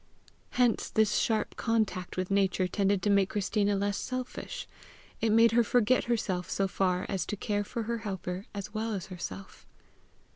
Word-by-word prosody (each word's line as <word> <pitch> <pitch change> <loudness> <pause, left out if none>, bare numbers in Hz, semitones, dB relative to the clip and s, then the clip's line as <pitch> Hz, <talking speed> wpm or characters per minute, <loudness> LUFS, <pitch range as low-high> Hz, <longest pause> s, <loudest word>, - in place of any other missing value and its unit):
Hence 245 -2 +3
this 220 -1 +3
sharp 220 -2 0
contact 215 -6 -1
with 185 +1 -2
Nature 190 -2 +2
tended 200 0 +1
to 205 - +3
make 200 -1 +4
Christina 205 0 +1
less 200 0 0
selfish: 255 - -5 0.5
it 225 - +2
made 230 +1 +6
her 235 +1 +4
forget 245 +2 +3
herself 195 -7 -1
so 195 - +1
far 185 -1 0
as 190 -3 -1
to 210 - -2
care 205 +1 -1
for 230 +3 -4
her 235 +1 -2
helper 190 -2 -5
as 200 0 -6
well 220 0 -1
as 190 -2 -4
herself. 190 +2 -8
205 Hz, 170 wpm, -30 LUFS, 190-225 Hz, 0.5 s, made